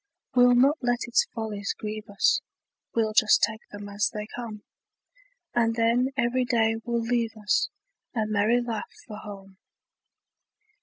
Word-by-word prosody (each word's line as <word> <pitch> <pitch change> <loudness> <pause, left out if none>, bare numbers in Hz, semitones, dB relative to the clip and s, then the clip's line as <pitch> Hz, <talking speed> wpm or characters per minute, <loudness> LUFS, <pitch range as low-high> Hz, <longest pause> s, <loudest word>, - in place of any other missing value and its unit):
We'll 245 0 +6
not 275 +5 +4
let 245 -1 0
its 240 - +2
follies 215 -3 -3
grieve 215 0 -6
us, 200 - +2 0.5
We'll 220 -2 +1
just 215 0 +5
take 220 +1 +1
them 205 0 -8
as 205 0 0
they 210 -1 -5
come; 220 -4 -7 0.9
And 230 -1 +2
then 235 +3 +2
every 250 +2 +2
day 225 -2 +2
will 235 0 -1
leave 230 -1 -1
us 215 +10 +1 0.5
A 220 -2 +1
merry 215 +3 +2
laugh 230 -3 -4 0.2
for 210 -2 -8
home. 195 -2 -10
225 Hz, 145 wpm, -26 LUFS, 210-240 Hz, 0.9 s, We'll